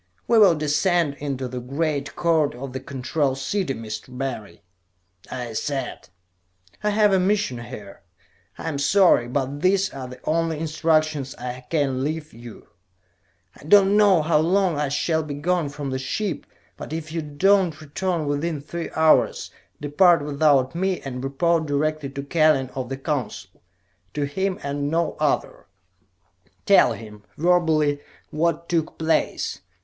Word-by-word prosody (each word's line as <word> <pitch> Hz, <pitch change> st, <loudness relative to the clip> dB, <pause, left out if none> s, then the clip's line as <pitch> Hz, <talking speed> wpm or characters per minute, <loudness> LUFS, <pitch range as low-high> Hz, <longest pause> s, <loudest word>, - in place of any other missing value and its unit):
"We 230 Hz, -1 st, +5 dB
will 195 Hz, -6 st, +7 dB
descend 150 Hz, +1 st, +1 dB
into 135 Hz, -3 st, -3 dB
the 125 Hz, 0 st, -5 dB
Great 140 Hz, +3 st, -2 dB
Court 160 Hz, -5 st, +1 dB
of 130 Hz, +1 st, -7 dB
the 130 Hz, -, -3 dB
Control 135 Hz, +1 st, -2 dB
City, 135 Hz, +2 st, -2 dB
Mr. 110 Hz, +3 st, -7 dB
Barry," 110 Hz, -6 st, -5 dB, 0.7 s
I 125 Hz, -3 st, -5 dB
said. 135 Hz, +2 st, -4 dB, 0.7 s
"I 210 Hz, -, +2 dB
have 210 Hz, -1 st, +3 dB
a 190 Hz, -, +4 dB
mission 190 Hz, -, 0 dB
here. 120 Hz, -5 st, -10 dB, 0.6 s
I -, -, -6 dB
am 145 Hz, -3 st, -2 dB
sorry, 160 Hz, -5 st, +4 dB
but 135 Hz, +3 st, -2 dB
these 195 Hz, +1 st, +2 dB
are 130 Hz, -2 st, -6 dB
the 125 Hz, 0 st, -11 dB
only 165 Hz, 0 st, 0 dB
instructions 155 Hz, -3 st, 0 dB
I 125 Hz, 0 st, -7 dB
can 135 Hz, -5 st, 0 dB
leave 155 Hz, +1 st, -4 dB
you. 120 Hz, 0 st, -12 dB, 0.9 s
"I -, -, -16 dB
do 195 Hz, +6 st, +6 dB
not 195 Hz, -, +1 dB
know 205 Hz, -5 st, +5 dB
how 155 Hz, -1 st, +3 dB
long 180 Hz, +2 st, +2 dB
I 145 Hz, -1 st, -1 dB
shall 160 Hz, +3 st, 0 dB
be 150 Hz, -2 st, -6 dB
gone 170 Hz, +1 st, 0 dB
from 145 Hz, -1 st, -5 dB
the 130 Hz, -, -2 dB
ship, 155 Hz, +4 st, -3 dB, 0.3 s
but -, -, -8 dB
if 160 Hz, -1 st, -5 dB
I -, -, 0 dB
do 160 Hz, +7 st, +3 dB
not 160 Hz, -3 st, -7 dB
return 170 Hz, +2 st, -2 dB
within 145 Hz, +2 st, -1 dB
three 165 Hz, +4 st, -6 dB
hours, 160 Hz, -1 st, +3 dB, 0.3 s
depart 150 Hz, +1 st, +4 dB
without 140 Hz, -3 st, +2 dB
me, 185 Hz, +1 st, -1 dB
and 130 Hz, -2 st, -6 dB
report 160 Hz, +4 st, +1 dB
directly 150 Hz, 0 st, -1 dB
to 140 Hz, 0 st, -6 dB
Kellen 145 Hz, -3 st, +2 dB
of 130 Hz, -2 st, -4 dB
the 135 Hz, -, -4 dB
Council. 125 Hz, -, -4 dB, 0.5 s
To 145 Hz, -, -1 dB
him, 190 Hz, +7 st, -1 dB
and 140 Hz, 0 st, -2 dB
no 165 Hz, +1 st, 0 dB
other. -, -, -1 dB, 1.0 s
Tell -, -, +5 dB
him, 105 Hz, -2 st, -11 dB, 0.2 s
verbally, 160 Hz, -4 st, +2 dB, 0.3 s
what 170 Hz, +1 st, 0 dB
took 165 Hz, -2 st, -1 dB
place. 160 Hz, 0 st, 0 dB
150 Hz, 155 wpm, -23 LUFS, 135-170 Hz, 1.0 s, will